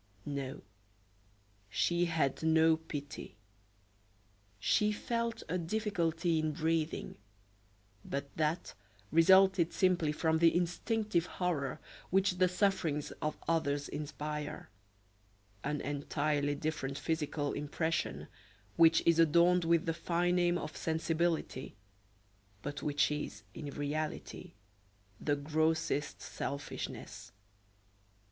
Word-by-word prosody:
No, 140 -1 -4 1.1
she 175 - +2
had 160 -5 0
no 160 0 +5
pity. 145 -7 -7 1.2
She 210 - +3
felt 230 +2 -2
a 180 +3 -1
difficulty 170 -3 0
in 155 -1 0
breathing, 160 +1 -1 0.9
but 140 0 -5
that 160 +2 -1 0.4
resulted 190 +1 +6
simply 180 -5 +2
from 160 +1 +1
the 165 0 +5
instinctive 180 +1 0
horror 155 -7 -2 0.3
which 190 0 +2
the 185 - +6
sufferings 180 -6 0
of 155 0 -1
others 145 -3 +1
inspire 150 0 -5 0.9
an 150 0 -1
entirely 145 0 -1
different 140 -2 -3
physical 150 -3 -1
impression, 145 - -2 0.5
which 165 0 +6
is 170 -1 +4
adorned 170 +2 +5
with 165 -1 +3
the 165 - 0
fine 175 +1 0
name 175 -1 +3
of 155 -2 -6
sensibility, 160 -3 -1 0.9
but 145 0 -4
which 145 0 +2
is, 150 -8 -4
in 145 - -6
reality, 145 +2 -4 0.7
the 145 - +1
grossest 155 0 0
selfishness. 140 0 -6
160 Hz, 100 wpm, -33 LUFS, 145-175 Hz, 1.2 s, resulted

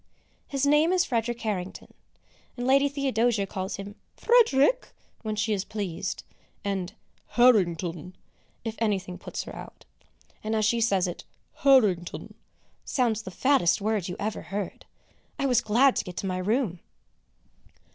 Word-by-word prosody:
His 275 -1 -1
name 295 +4 +4
is 365 -1 +3
Frederick 235 -1 -1
Harrington, 195 -4 -4 0.6
and 245 - -3
Lady 275 +2 +4
Theodosia 245 -6 +1
calls 190 -1 -4
him 200 +1 -7 0.2
"Frederick" 470 - +3 0.3
when 215 -1 -3
she 215 +1 0
is 195 -2 -1
pleased, 195 -3 -4 0.4
and 195 -2 -3 0.4
"Harrington" 180 -7 +3 0.5
if 225 - -2
anything 195 -5 -1
puts - - -5
her - - -9
out. - - -11 0.6
And 220 +1 -1
as 215 -1 +2
she 230 +2 +2
says 195 -5 +2
it, 175 -1 -5 0.3
"Harrington" 210 -11 +3 0.5
sounds 230 -4 0
the 205 - -8
fattest 220 -3 +2
word 210 -3 -1
you 180 - -4
ever 210 +1 -3
heard. 200 -1 -5 0.5
I 275 - -1
was 250 -4 +3
glad 245 +5 +4
to - - 0
get 180 -1 -9
to - - -3
my 185 -1 -2
room! 205 -2 0
215 Hz, 145 wpm, -27 LUFS, 190-255 Hz, 0.6 s, name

